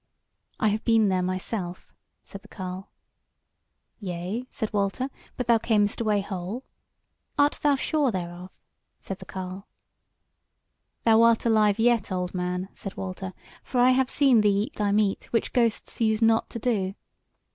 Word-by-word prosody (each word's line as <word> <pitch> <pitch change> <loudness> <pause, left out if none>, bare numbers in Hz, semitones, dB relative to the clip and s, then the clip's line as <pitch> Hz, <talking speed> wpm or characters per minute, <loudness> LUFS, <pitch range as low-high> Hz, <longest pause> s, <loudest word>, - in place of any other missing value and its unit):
"I 215 - +3
have 215 +1 -1
been 225 -3 +4
there 185 -1 +1
myself," 185 0 -4 0.3
said 200 - -10
the 210 - -17
carle. 185 0 -7 1.1
"Yea," 190 +5 -4
said 220 -2 -4
Walter, 205 +6 -1 0.3
"but 250 - -2
thou 235 -1 +4
camest 210 -1 +1
away 210 -3 +2
whole." 195 +5 -5 0.7
"Art 290 +1 +3
thou 290 -1 +4
sure 290 0 +1
thereof?" 180 -2 -5 0.5
said 195 - -6
the - - -10
carle. 185 +1 -7 1.4
"Thou 225 -1 +5
art 230 0 +4
alive 215 -3 +4
yet, 230 -3 +2
old 180 -1 -2
man," 180 +1 -2
said 195 - -7
Walter, 190 0 -5 0.3
"for 250 - -2
I 250 +1 +6
have 260 0 +2
seen 270 -6 +4
thee 205 -1 +3
eat 270 - -7
thy 205 -1 0
meat, 205 -1 +1
which 230 - -1
ghosts 235 -1 0
use 220 -1 +2
not 225 0 +3
to - - -5
do." 205 -5 -1
210 Hz, 155 wpm, -26 LUFS, 190-230 Hz, 1.4 s, I